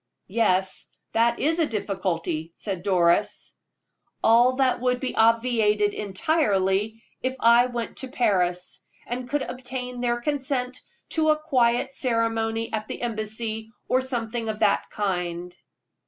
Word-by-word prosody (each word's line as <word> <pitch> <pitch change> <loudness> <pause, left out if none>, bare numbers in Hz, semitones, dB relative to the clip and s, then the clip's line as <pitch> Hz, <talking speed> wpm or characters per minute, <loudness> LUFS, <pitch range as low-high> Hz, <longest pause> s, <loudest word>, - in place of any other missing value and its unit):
"Yes, 190 -4 +1 0.2
that 230 +1 +2
is 325 +3 +1
a 320 - +3
difficulty," 170 - -2
said 195 -4 -4
Doris. 175 -3 +1 0.7
"All 240 +3 +5
that 260 -1 +2
would 250 0 +1
be 260 - -3
obviated 225 -2 +3
entirely 205 - 0 0.2
if 260 0 -1
I 235 +2 +6
went 240 -2 -5
to 265 - -4
Paris, 180 -8 0 0.2
and 245 +1 -5
could 290 +1 0
obtain 250 -1 -5
their 240 -1 0
consent 260 -2 -2 0.3
to 315 -1 +1
a 305 - +4
quiet 255 -5 +1
ceremony 225 -2 -1
at 215 -1 -2
the - - -6
embassy, 220 0 -3 0.2
or 255 - +2
something 235 -3 -2
of 215 - -3
that - - +2
kind." 180 -3 -3
230 Hz, 130 wpm, -25 LUFS, 205-250 Hz, 0.7 s, I